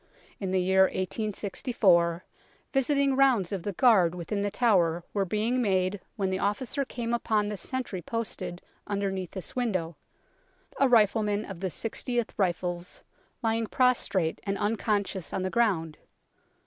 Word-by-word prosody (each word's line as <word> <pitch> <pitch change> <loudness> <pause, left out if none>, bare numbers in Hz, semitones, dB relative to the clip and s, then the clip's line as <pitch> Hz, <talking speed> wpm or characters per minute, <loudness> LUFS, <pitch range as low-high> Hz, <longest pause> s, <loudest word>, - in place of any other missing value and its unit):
In 195 - -3
the 185 0 +2
year 190 +1 +4
1864, 190 -3 0 0.5
visiting 275 0 +2
rounds 260 -9 +3
of 195 -3 -2
the 205 - -3
guard 185 -6 +4
within 180 +4 -3
The 205 - 0
Tower 180 -7 +2
were 200 -2 +1
being 220 +6 0
made 190 -2 +1 0.2
when 195 -4 -1
the 190 - -1
officer 235 +8 -1
came 240 -3 -4
upon 215 -3 +1
the 210 - -3
sentry 225 -3 -4
posted 185 -3 -4 0.2
under 200 -1 -1
neath 190 -2 -4
this 190 -3 -5
window, 185 - -1 0.8
a 275 - +4
rifleman 215 -2 +3
of 195 -4 -8
the 190 - -1
6oth 235 - -2
Rifles, 175 -2 -2 0.4
lying 225 0 +1
prostrate 200 -10 +1
and 200 0 -2
unconscious 205 -3 -1
on 190 - -1
the 185 - -2
ground. 180 -10 +1
200 Hz, 145 wpm, -28 LUFS, 185-230 Hz, 0.8 s, year